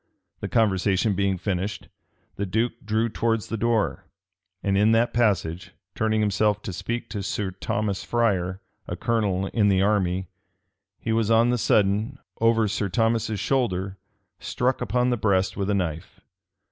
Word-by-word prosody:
The -, -, -4 dB
conversation 100 Hz, -1 st, +2 dB
being 100 Hz, 0 st, 0 dB
finished, 95 Hz, +2 st, -3 dB, 0.5 s
the 100 Hz, -, -3 dB
duke 110 Hz, +6 st, +1 dB
drew 110 Hz, +2 st, +1 dB
towards 115 Hz, -1 st, -1 dB
the -, -, -2 dB
door; 115 Hz, -1 st, 0 dB, 0.6 s
and 100 Hz, -1 st, +1 dB
in 105 Hz, +3 st, +4 dB
that 115 Hz, +1 st, +2 dB
passage, 95 Hz, -6 st, 0 dB, 0.2 s
turning 110 Hz, 0 st, +1 dB
himself 105 Hz, 0 st, +1 dB
to 95 Hz, -, -5 dB
speak 115 Hz, +7 st, -4 dB
to 105 Hz, -1 st, -4 dB
Sir 95 Hz, 0 st, -2 dB
Thomas 100 Hz, +1 st, -2 dB
Friar, 95 Hz, -6 st, 0 dB, 0.3 s
a -, -, -3 dB
colonel 105 Hz, -5 st, 0 dB
in 105 Hz, -3 st, +3 dB
the 95 Hz, -1 st, +3 dB
army, 95 Hz, -3 st, +1 dB, 0.7 s
he 110 Hz, -, -2 dB
was 115 Hz, -1 st, +1 dB
on 115 Hz, +1 st, +4 dB
the 125 Hz, -, +1 dB
sudden, 105 Hz, +6 st, +2 dB, 0.2 s
over 115 Hz, -1 st, +3 dB
Sir 100 Hz, -1 st, -1 dB
Thomas's 115 Hz, 0 st, 0 dB
shoulder, 100 Hz, -6 st, -1 dB, 0.4 s
struck 125 Hz, +1 st, -1 dB
upon 125 Hz, +2 st, +1 dB
the 120 Hz, -, +1 dB
breast 100 Hz, -3 st, +1 dB
with 100 Hz, 0 st, -2 dB
a 105 Hz, -, +2 dB
knife. 85 Hz, -2 st, -3 dB
105 Hz, 155 wpm, -25 LUFS, 95-115 Hz, 0.7 s, in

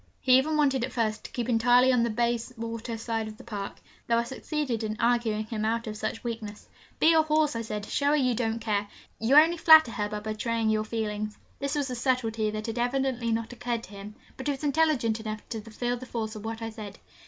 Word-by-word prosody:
He 255 Hz, -1 st, +5 dB
even 305 Hz, +3 st, 0 dB
wanted 270 Hz, -4 st, +2 dB
at 260 Hz, -, -3 dB
first 215 Hz, -3 st, -1 dB
to -, -, -8 dB
keep 240 Hz, -2 st, -3 dB
entirely 245 Hz, +2 st, +4 dB
on 245 Hz, -, +3 dB
the 235 Hz, -, +1 dB
Bayswater 230 Hz, 0 st, -2 dB
side 225 Hz, -1 st, -2 dB
of 215 Hz, 0 st, -9 dB
the -, -, -12 dB
Park, 200 Hz, -3 st, -5 dB, 0.3 s
though 230 Hz, -, +3 dB
I 235 Hz, -, +2 dB
succeeded 260 Hz, -1 st, -3 dB
in 215 Hz, 0 st, -3 dB
arguing 230 Hz, -2 st, +1 dB
him 215 Hz, -1 st, -4 dB
out 230 Hz, +2 st, 0 dB
of 215 Hz, -1 st, -5 dB
such 220 Hz, -, -4 dB
weakness. 225 Hz, -3 st, -6 dB, 0.3 s
'Be 325 Hz, -, +6 dB
a 320 Hz, -, +6 dB
horse!' 305 Hz, -3 st, +1 dB
I 230 Hz, -, -1 dB
said. 210 Hz, -2 st, -5 dB
'Show 285 Hz, -, -1 dB
her 295 Hz, -, +4 dB
you 255 Hz, -4 st, +2 dB
don't 225 Hz, -1 st, -1 dB
care. 210 Hz, -2 st, -1 dB, 0.3 s
You 230 Hz, +5 st, +2 dB
only 325 Hz, +3 st, +7 dB
flatter 315 Hz, -6 st, +8 dB
her 210 Hz, -2 st, -2 dB
by 210 Hz, 0 st, -4 dB
betraying 220 Hz, +1 st, -1 dB
your 215 Hz, 0 st, 0 dB
feelings.' 215 Hz, -1 st, -3 dB, 0.2 s
This 280 Hz, +1 st, -2 dB
was 285 Hz, -3 st, -1 dB
a -, -, -3 dB
subtlety 230 Hz, -3 st, 0 dB
that 215 Hz, 0 st, -4 dB
had 225 Hz, +1 st, -3 dB
evidently 245 Hz, -1 st, 0 dB
not 225 Hz, +1 st, -2 dB
occurred 240 Hz, -1 st, -3 dB
to -, -, -11 dB
him, 200 Hz, +1 st, -9 dB, 0.2 s
but 265 Hz, -, -5 dB
he -, -, +2 dB
was 270 Hz, -, -9 dB
intelligent 285 Hz, -7 st, +2 dB
enough 215 Hz, -1 st, -6 dB
to 225 Hz, -2 st, -4 dB
feel 240 Hz, +3 st, -3 dB
the 255 Hz, +1 st, -9 dB
force 220 Hz, -2 st, -4 dB
of 210 Hz, -, -8 dB
what 225 Hz, 0 st, -5 dB
I 225 Hz, -, -4 dB
said. 210 Hz, -3 st, -9 dB
230 Hz, 235 wpm, -27 LUFS, 220-255 Hz, 0.3 s, flatter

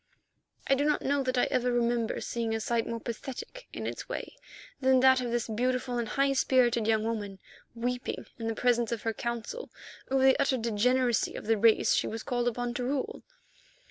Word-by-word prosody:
I -, -, +3 dB
do 275 Hz, +1 st, +2 dB
not 300 Hz, 0 st, +1 dB
know 280 Hz, +1 st, +1 dB
that 255 Hz, -1 st, -1 dB
I -, -, +4 dB
ever 250 Hz, -2 st, +1 dB
remember 235 Hz, -1 st, 0 dB
seeing 230 Hz, -1 st, -2 dB
a -, -, -1 dB
sight 230 Hz, +1 st, -1 dB
more 230 Hz, 0 st, -3 dB
pathetic 260 Hz, -, -7 dB
in -, -, -6 dB
its -, -, -5 dB
way -, -, -5 dB, 0.4 s
than 260 Hz, -1 st, +4 dB
that 260 Hz, 0 st, +6 dB
of 245 Hz, -, -2 dB
this 235 Hz, -1 st, -1 dB
beautiful 245 Hz, +2 st, -1 dB
and 235 Hz, -, -2 dB
high 275 Hz, +2 st, +2 dB
spirited 245 Hz, -4 st, +3 dB
young 220 Hz, -1 st, +2 dB
woman 210 Hz, -4 st, -3 dB, 0.4 s
weeping 245 Hz, +2 st, -3 dB
in 225 Hz, -, -3 dB
the 225 Hz, -, -1 dB
presence 240 Hz, -1 st, +2 dB
of 230 Hz, -2 st, -3 dB
her 225 Hz, -, 0 dB
Council 235 Hz, -, -4 dB, 0.4 s
over 265 Hz, 0 st, +2 dB
the 265 Hz, +2 st, +5 dB
utter 275 Hz, -2 st, +2 dB
degeneracy 240 Hz, +1 st, +1 dB
of -, -, -7 dB
the 225 Hz, +1 st, +3 dB
race 220 Hz, +1 st, +4 dB
she -, -, +1 dB
was 225 Hz, 0 st, -5 dB
called 245 Hz, -2 st, -1 dB
upon 245 Hz, 0 st, -1 dB
to 245 Hz, -, -3 dB
rule. 265 Hz, +1 st, -2 dB
245 Hz, 200 wpm, -29 LUFS, 230-260 Hz, 0.4 s, that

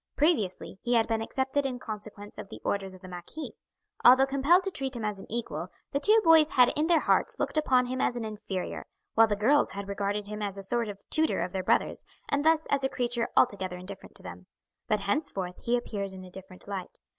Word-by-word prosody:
Previously 220 Hz, -, 0 dB
he 245 Hz, 0 st, +1 dB
had 225 Hz, -1 st, +3 dB
been 225 Hz, -1 st, 0 dB
accepted 265 Hz, +4 st, -1 dB
in 265 Hz, -2 st, -2 dB
consequence 210 Hz, -3 st, -9 dB
of -, -, -8 dB
the -, -, -9 dB
orders 195 Hz, -1 st, -2 dB
of 185 Hz, -, -16 dB
the 185 Hz, -, -10 dB
marquis. 180 Hz, -, -8 dB, 0.5 s
Although 260 Hz, +2 st, +8 dB
compelled 280 Hz, +7 st, +3 dB
to 390 Hz, -, -3 dB
treat 270 Hz, -5 st, -3 dB
him 230 Hz, -2 st, -4 dB
as 210 Hz, -2 st, -3 dB
an -, -, -11 dB
equal 235 Hz, +1 st, -3 dB, 0.2 s
the 280 Hz, -, 0 dB
two 430 Hz, +8 st, +5 dB
boys 320 Hz, -3 st, +6 dB
had 250 Hz, -5 st, +5 dB
in 305 Hz, +2 st, +1 dB
their 335 Hz, -2 st, +4 dB
hearts -, -, +1 dB
looked -, -, -2 dB
upon 260 Hz, -5 st, +3 dB
him 255 Hz, +1 st, -3 dB
as 245 Hz, -, +1 dB
an 235 Hz, -2 st, -3 dB
inferior, 205 Hz, -3 st, -5 dB, 0.3 s
while 225 Hz, 0 st, +6 dB
the 210 Hz, -, 0 dB
girls 260 Hz, +8 st, +3 dB
had 200 Hz, 0 st, -6 dB
regarded 200 Hz, +1 st, -2 dB
him 210 Hz, +1 st, -6 dB
as 200 Hz, -1 st, -3 dB
a 195 Hz, -, -6 dB
sort 235 Hz, +3 st, 0 dB
of 200 Hz, -, -6 dB
tutor 315 Hz, 0 st, +3 dB
of 180 Hz, -, -2 dB
their 190 Hz, -, -2 dB
brothers, 185 Hz, -, +1 dB, 0.2 s
and 285 Hz, 0 st, 0 dB
thus 320 Hz, 0 st, +3 dB
as 280 Hz, -1 st, +2 dB
a 265 Hz, -, +1 dB
creature 240 Hz, -2 st, -1 dB
altogether 190 Hz, -6 st, +2 dB
indifferent 190 Hz, +2 st, -10 dB
to -, -, -14 dB
them. 90 Hz, 0 st, -10 dB, 0.4 s
But 210 Hz, -1 st, +1 dB
henceforth 200 Hz, -, -2 dB
he 240 Hz, +1 st, +1 dB
appeared 200 Hz, -5 st, -4 dB
in 185 Hz, 0 st, -9 dB
a 185 Hz, -, -12 dB
different 185 Hz, 0 st, -11 dB
light. 195 Hz, -3 st, -6 dB
225 Hz, 225 wpm, -28 LUFS, 195-270 Hz, 0.5 s, Although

